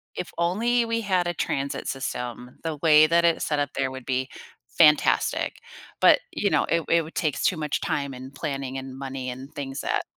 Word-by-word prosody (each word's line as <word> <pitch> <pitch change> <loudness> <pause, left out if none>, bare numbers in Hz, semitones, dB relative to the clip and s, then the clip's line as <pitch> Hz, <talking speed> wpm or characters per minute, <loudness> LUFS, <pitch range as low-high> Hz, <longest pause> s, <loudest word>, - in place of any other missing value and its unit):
if - - -5
only 230 +8 +1
we 230 0 -1
had 185 -4 +1
a 175 - -1
transit 140 -3 -2
system, 125 -2 -5
the 160 -2 -3
way 155 -1 +7
that 170 +1 +3
it's 170 - +2
set 150 -1 0
up 145 -1 0
there 135 -1 -1
would 130 -1 -8
be 130 0 -1 0.5
fantastic. 150 -2 +4 0.4
But, - - +6
you - - 0
know, - - +2
it 170 -1 0
it 170 0 +4
would 160 - -12
take 155 -5 -1
too 180 - +2
much 150 -2 -2
time 140 -2 -2
and 130 +2 -9
planning 135 -3 -4
and 135 0 -7
money 135 -1 -5
and 130 +3 -8
things 135 -1 -5
that, - - -1
145 Hz, 200 wpm, -25 LUFS, 135-170 Hz, 0.5 s, way